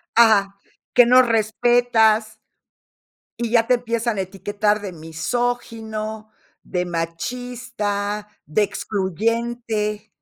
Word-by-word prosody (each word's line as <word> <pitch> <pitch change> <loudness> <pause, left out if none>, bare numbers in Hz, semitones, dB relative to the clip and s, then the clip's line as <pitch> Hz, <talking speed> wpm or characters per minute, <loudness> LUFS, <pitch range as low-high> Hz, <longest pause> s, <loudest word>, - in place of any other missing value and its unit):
Ajá, 205 -4 +5 0.4
que 245 -1 +7
no 255 +1 +7
respetas 225 -1 +2 1.0
y 235 -1 -1
ya 230 -1 +3
te 250 - +5
empiezan 235 -2 -2
a - - +1
etiquetar 205 +2 -1
de 200 - -5
misógino, 220 +5 -3 0.3
de 180 -1 -2
machista, 210 +4 -3 0.2
de 155 +8 +1
excluyente. 215 +2 -2
220 Hz, 95 wpm, -22 LUFS, 205-235 Hz, 1.0 s, que